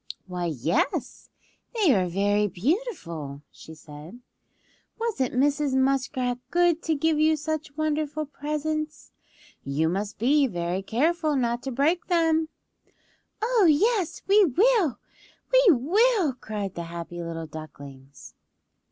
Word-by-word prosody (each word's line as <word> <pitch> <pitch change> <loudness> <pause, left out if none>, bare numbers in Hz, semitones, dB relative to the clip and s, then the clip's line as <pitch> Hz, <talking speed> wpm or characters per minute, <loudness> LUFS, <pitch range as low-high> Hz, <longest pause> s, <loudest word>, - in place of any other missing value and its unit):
"Why, 180 -1 -4
yes, 165 - -2 0.5
they 395 - +4
are 185 -4 +1
very 205 +3 +1
beautiful," 175 - -3
she 160 - -13
said. 155 +8 -12 0.8
"Wasn't 410 - -1
Mrs. 280 +1 +1
Muskrat 260 -2 0
good 345 -1 +2
to 320 - 0
give 310 +1 +1
you 315 +1 +4
such 310 -1 -4
wonderful 310 0 -1
presents. 305 +1 -4 0.5
You 150 +4 0
must 200 +4 -3
be 275 +5 +3
very 175 -2 -3
careful 310 - 0
not 240 -2 0
to 270 - -5
break 305 +8 +1
them." 325 -2 +2 0.9
"Oh, 450 -5 +3
yes, 385 +4 +1
we 405 +2 +6
will! 375 - +3 0.6
We - - +6
will!" 360 - +3
cried 210 -6 -5
the 170 - -5
happy 170 +1 -7
little 165 -1 -5
ducklings. 140 -3 -11
275 Hz, 120 wpm, -25 LUFS, -, 0.9 s, we